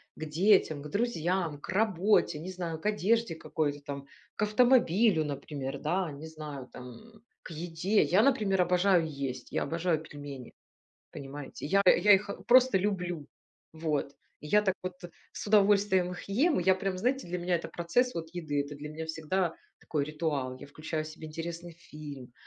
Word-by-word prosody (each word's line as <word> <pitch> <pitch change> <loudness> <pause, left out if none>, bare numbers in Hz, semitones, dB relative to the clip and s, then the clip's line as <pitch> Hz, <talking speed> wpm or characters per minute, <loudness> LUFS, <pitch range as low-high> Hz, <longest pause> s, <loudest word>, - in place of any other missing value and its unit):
к 155 - -6
детям, 160 -1 +3
к 150 - -7
друзьям, 180 -6 -1
к - - -11
работе, 195 -4 +2
не 180 +4 -6
знаю, 170 -3 -4
к - - -18
одежде 210 -1 +1
какой-то 150 -2 -2
там, 140 -1 -6 0.3
к - - -1
автомобилю, 210 -6 +4
например, 140 -1 -5
да, 175 +1 -1
не 145 +3 -8
знаю, 150 -4 -8
там, 170 - -12 0.2
к - - -11
еде. 170 +5 +1
Я, 190 +4 +4
например, 215 -8 +3
обожаю 180 0 +3
есть, 135 -4 -5
я - - 0
обожаю 165 -1 0
пельмени, 145 -5 -9 0.6
понимаете, 140 +1 -8
я 195 +7 +3
я 200 +3 +7
их 200 +1 +2 0.2
просто 255 -3 +6
люблю. 180 -6 -2 0.5
Вот. 155 -3 -2 0.2
И 150 - -9
я 210 +7 +4
так 190 -3 0
вот 185 0 -4 0.4
с - - -7
удовольствием 200 -3 +4
их 180 - -7
ем, 280 - +3
и - - -2
я 190 0 +5
прям, 190 0 -2
знаете, 255 +7 0
для 180 +1 -3
меня 175 0 +1
это 170 - -4
процесс 210 +9 0
вот 165 -1 -4
еды, 155 -5 -2
это 140 +1 -7
для 150 +1 -7
меня 160 +1 -6
всегда 160 +2 -1 0.2
такой 150 -3 -2
ритуал, 145 -4 -2
я - - -10
включаю 155 +2 -4
себе 155 0 -9
интересный 170 +2 -6
фильм, 150 -6 -10
170 Hz, 170 wpm, -30 LUFS, 150-195 Hz, 0.6 s, я